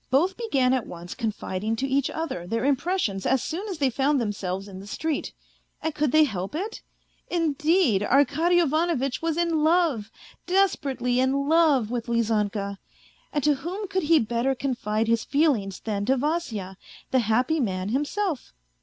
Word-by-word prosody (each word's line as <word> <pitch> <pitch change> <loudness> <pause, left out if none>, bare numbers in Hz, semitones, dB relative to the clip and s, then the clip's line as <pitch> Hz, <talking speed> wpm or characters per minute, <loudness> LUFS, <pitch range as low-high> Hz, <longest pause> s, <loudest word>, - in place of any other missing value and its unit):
Both 330 +9 +2
began 275 - +1
at 255 -4 -1
once 175 +1 -8
confiding 215 -2 -3
to 265 +4 -2
each 275 0 +1
other 310 - -4
their 230 +5 -1
impressions 280 - 0
as 265 -1 +2
soon 370 +7 -4
as 380 -5 -4
they 275 -3 +1
found 275 +3 +2
themselves 195 -3 -3
in 190 -2 -9
the 195 - -10
street. 315 +7 -2 0.5
And 320 - -2
could 295 -3 0
they 310 +1 +6
help 195 -3 -3
it? 410 +7 -4 0.5
Indeed, 315 - +2
Arkady 285 +9 +3
Ivanovitch 310 -4 +1
was 330 -1 -1
in 335 -3 +1
love, 315 -10 +2 0.4
desperately 275 -10 +1
in 275 +2 +1
love, 300 -8 +3
with 240 -1 -3
Lizanka. 210 -4 0 0.5
And 295 -3 -1
to 300 - +4
whom 360 +9 -5
could 375 0 -1
he 330 - +7
better 240 +2 0
confide 225 -5 -1
his 230 0 +2
feelings 265 - +1
than 205 -2 -2
to 265 +1 +3
Vasya, 245 - -2 0.3
the 260 - +4
happy 250 +8 +1
man 190 -6 -1
himself. 295 - -2
270 Hz, 165 wpm, -25 LUFS, 220-320 Hz, 0.5 s, he